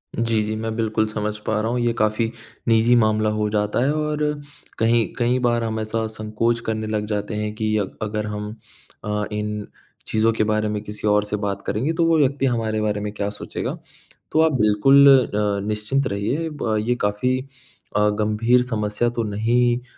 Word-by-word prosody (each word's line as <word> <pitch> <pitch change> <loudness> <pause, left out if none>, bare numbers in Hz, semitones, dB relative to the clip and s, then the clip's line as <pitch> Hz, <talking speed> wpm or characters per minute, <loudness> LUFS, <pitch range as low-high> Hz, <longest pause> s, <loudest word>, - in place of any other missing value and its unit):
जी, 115 -1 +1
जी, 110 +1 -3
मैं 110 0 -3
बिल्कुल 110 -1 0
समझ 105 0 -3
पा 110 -1 +1
रहा 110 +2 -1
हूँ, 125 - 0
ये 120 -1 +1
काफ़ी 110 +1 0 0.4
निजी 115 +1 +4
मामला 110 -2 +3
हो 105 0 0
जाता 105 0 0
है 140 - +2
और 150 0 -1 0.6
कहीं 115 0 +3
कई 125 +1 +2
बार 120 -2 +1
हम 110 -1 -2
ऐसा 110 +1 -2
संकोच 110 +2 -1
करने 110 -1 -2
लग 105 -1 -1
जाते 105 0 -3
हैं 105 0 -2
कि 110 0 -1
अग 100 -3 -3
अगर 105 0 -2
हम 105 0 -4 0.5
अ, 105 0 -1
इन 105 0 -3 0.4
चीज़ों 110 +1 +2
के 110 - +1
बारे 110 0 +1
में 105 -1 -2
किसी 105 0 -4
और 105 0 +3
से 105 0 -3
बात 100 -1 -3
करेंगे, 135 +10 -1
तो 170 0 +2
वो 165 -1 +4
व्यक्ति 140 -1 +2
हमारे 110 -4 0
बारे 105 -1 0
में 105 0 -3
क्या 100 -1 -2
सोचेगा। 105 - -5 0.5
तो 160 - +4
आप 160 0 +4
बिल्कुल 120 +7 +6 0.2
अ, 105 -1 -1
निश्चिंत 105 +6 0
रहिए 115 +11 -2
ब 110 -2 0
ये 125 - +2
काफ़ी 105 +6 +1 0.6
अ, 105 0 +4
गंभीर 110 +4 +2
समस्या 110 -1 -1
तो - - +2
नहीं 120 +3 +1
अ, - - -19
110 Hz, 190 wpm, -22 LUFS, 105-120 Hz, 0.6 s, बिल्कुल